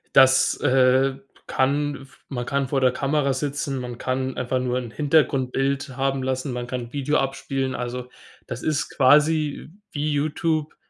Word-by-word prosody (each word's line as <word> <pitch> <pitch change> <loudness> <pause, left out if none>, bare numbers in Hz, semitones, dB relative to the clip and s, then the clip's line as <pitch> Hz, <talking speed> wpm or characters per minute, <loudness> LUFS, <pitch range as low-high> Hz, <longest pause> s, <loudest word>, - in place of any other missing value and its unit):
Das, 130 0 +6
äh, 130 +1 +4 0.3
kann 140 +1 0
v 135 - -22
man 120 -3 -3
kann 140 +1 -1
vor 135 +1 0
der 130 - +4
Kamera 140 +1 0
sitzen, 140 0 -2
man 125 -1 -6
kann 130 +1 -2
einfach 130 +1 -1
nur 125 0 -1
'n 120 -3 -5
Hintergrundbild 135 -2 +1
haben 135 0 0
lassen, 130 +1 -2
man 120 0 -4
kann 125 0 -3
'n 120 +2 -10
Video 145 +1 +1
abspielen. 135 0 -2
Also, 125 0 -5 0.4
das 120 0 -5
ist 155 -2 0
quasi 150 +2 +3 0.2
wie 150 0 -1
Youtube, 155 +1 -1
135 Hz, 160 wpm, -23 LUFS, 130-145 Hz, 0.4 s, Das